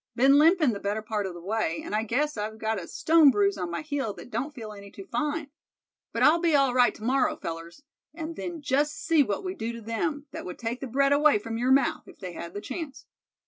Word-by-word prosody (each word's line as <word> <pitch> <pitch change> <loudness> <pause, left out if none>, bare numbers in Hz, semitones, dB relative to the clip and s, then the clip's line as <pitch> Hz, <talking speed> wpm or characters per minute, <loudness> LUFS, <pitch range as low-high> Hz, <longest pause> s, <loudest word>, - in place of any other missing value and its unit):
Been 275 +3 +6
limpin' 315 -5 +5
the 200 - -5
better 205 +2 -2
part 210 -2 -2
of 180 - -7
the 170 - -10
way, 200 -4 -1
and - - -6
I 215 - +2
guess 280 +7 0
I've 215 +1 -4
got 220 -1 -1
a 170 - -9
stone 320 -2 +5
bruise 205 -5 +2
on 180 -3 -4
my 170 - -4
heel 285 -8 -2
that 195 +6 -12
don't 285 +3 -2
feel 225 -7 -8
any 200 -1 -11
too 195 0 -11
fine. 295 +5 -2 0.6
But - - 0
I'll 320 +3 +6
be 335 -3 +2
all 275 -3 +3
right 245 -1 +4
to - - -12
morrow, 255 +3 +2
fellers; 170 - -7 0.3
and 325 +1 -6
then 335 -2 -6
just 290 +2 +1
see 330 -6 +3
what 205 -7 -1
we 370 -1 -3
do 230 -8 -4
to 235 - -8
them 285 +7 -2
that - - -6
would 180 - -7
take 235 +1 -3
the 270 - -4
bread 275 +3 +3
away 295 -3 +5
from 225 +2 -5
your 250 +2 +2
mouth, 270 -1 +2
if - - -14
they 180 -2 -7
had 170 +2 -8
the 205 - -4
chance." 285 +2 -6
245 Hz, 250 wpm, -27 LUFS, 210-295 Hz, 0.6 s, Been